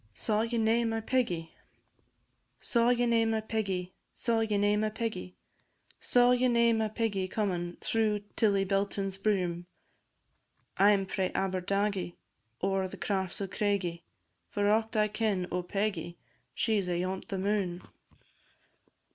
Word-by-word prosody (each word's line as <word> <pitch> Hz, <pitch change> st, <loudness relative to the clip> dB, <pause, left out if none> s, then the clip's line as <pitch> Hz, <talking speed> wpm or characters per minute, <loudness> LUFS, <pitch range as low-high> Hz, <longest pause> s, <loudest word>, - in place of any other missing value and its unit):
SAW 215 Hz, -1 st, 0 dB
YE 230 Hz, +1 st, -1 dB
NAE 225 Hz, +1 st, +3 dB
MY 225 Hz, 0 st, -1 dB
PEGGY? 215 Hz, -10 st, -1 dB, 1.1 s
Saw 235 Hz, 0 st, +2 dB
ye 245 Hz, 0 st, +3 dB
nae 230 Hz, -1 st, +3 dB
my 225 Hz, 0 st, +1 dB
Peggy? 195 Hz, -5 st, -2 dB, 0.2 s
Saw 230 Hz, -1 st, +1 dB
ye 220 Hz, -2 st, +1 dB
nae 205 Hz, +1 st, +3 dB
my 215 Hz, +1 st, +1 dB
Peggy? 215 Hz, -5 st, -4 dB, 0.6 s
Saw 245 Hz, 0 st, +4 dB
ye 250 Hz, 0 st, +3 dB
nae 235 Hz, -1 st, +4 dB
my 220 Hz, -1 st, +1 dB
Peggy 210 Hz, -3 st, -1 dB
comin' 180 Hz, -4 st, -2 dB
Through 215 Hz, -2 st, +1 dB
Tillibelton's 195 Hz, -2 st, +1 dB
broom? 180 Hz, -4 st, 0 dB, 1.1 s
I 200 Hz, +2 st, +6 dB
'm 195 Hz, -1 st, +1 dB
frae 190 Hz, 0 st, -1 dB
Aberdagie, 195 Hz, 0 st, -1 dB, 0.5 s
Ower 195 Hz, 0 st, +1 dB
the -, -, -9 dB
crafts 190 Hz, -2 st, -2 dB
o' 195 Hz, -, -1 dB
Craigie, 195 Hz, -4 st, -1 dB, 0.5 s
For 205 Hz, 0 st, +1 dB
aught 220 Hz, +1 st, +1 dB
I 215 Hz, 0 st, +4 dB
ken 210 Hz, -3 st, 0 dB
o' 180 Hz, -, 0 dB
Peggie, 180 Hz, -2 st, -2 dB, 0.4 s
She 220 Hz, -3 st, +2 dB
's 180 Hz, -, -5 dB
ayont 185 Hz, +2 st, -2 dB
the 200 Hz, -4 st, -3 dB
moon. 190 Hz, -2 st, -1 dB
205 Hz, 140 wpm, -30 LUFS, 185-225 Hz, 1.1 s, I